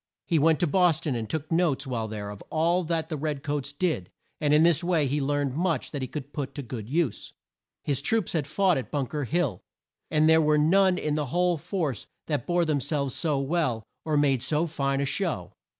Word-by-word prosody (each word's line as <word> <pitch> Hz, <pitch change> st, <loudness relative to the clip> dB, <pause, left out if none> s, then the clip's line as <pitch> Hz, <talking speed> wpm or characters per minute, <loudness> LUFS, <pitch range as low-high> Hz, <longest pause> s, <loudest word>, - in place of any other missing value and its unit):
He 165 Hz, -, +2 dB
went 160 Hz, +1 st, +4 dB
to -, -, +4 dB
Bos 175 Hz, -1 st, +3 dB
ton, 145 Hz, -, -2 dB
and 115 Hz, -3 st, -3 dB
took 155 Hz, +4 st, -4 dB
notes 165 Hz, -5 st, +1 dB
while 120 Hz, -4 st, -2 dB
there 105 Hz, -1 st, -5 dB
of 105 Hz, -, -10 dB
all 170 Hz, +3 st, +2 dB
that 160 Hz, -1 st, -1 dB
the 155 Hz, -, -3 dB
red 145 Hz, -1 st, -3 dB
coats 145 Hz, -1 st, -2 dB
did, 145 Hz, -, -1 dB, 0.3 s
and 150 Hz, -1 st, +1 dB
in 150 Hz, +2 st, +6 dB
this 170 Hz, 0 st, +4 dB
way 170 Hz, -5 st, +2 dB
learned 145 Hz, -1 st, 0 dB
much 170 Hz, +2 st, -1 dB
that 145 Hz, -, -4 dB
he 130 Hz, -, -2 dB
could 140 Hz, +1 st, -7 dB
put 140 Hz, -3 st, -4 dB
to 145 Hz, -, -4 dB
good 115 Hz, -3 st, -7 dB
use. 155 Hz, -5 st, -1 dB, 0.5 s
His 140 Hz, -2 st, 0 dB
troops 220 Hz, +5 st, 0 dB
had 155 Hz, -5 st, -1 dB
fought 185 Hz, 0 st, +2 dB
at 130 Hz, -, -7 dB
Bunk 140 Hz, -2 st, -2 dB
er 145 Hz, -2 st, -1 dB
Hill, 140 Hz, -, -1 dB, 0.5 s
and 155 Hz, 0 st, +3 dB
there 160 Hz, 0 st, +6 dB
were 150 Hz, -1 st, +3 dB
none 185 Hz, +4 st, +4 dB
in 150 Hz, -4 st, -1 dB
the 150 Hz, -1 st, -1 dB
whole 175 Hz, +5 st, +2 dB
force 155 Hz, -, -3 dB, 0.2 s
that 145 Hz, -6 st, -2 dB
bore 175 Hz, -1 st, +2 dB
them 155 Hz, -3 st, +1 dB
selves 140 Hz, -1 st, -1 dB
so 155 Hz, -4 st, 0 dB
well, 135 Hz, -5 st, 0 dB, 0.2 s
or 155 Hz, -2 st, 0 dB
made 140 Hz, -4 st, +3 dB
so 155 Hz, +5 st, +1 dB
fine 140 Hz, -4 st, -1 dB
a -, -, +1 dB
show. 140 Hz, -, -2 dB
150 Hz, 220 wpm, -27 LUFS, 135-165 Hz, 0.5 s, in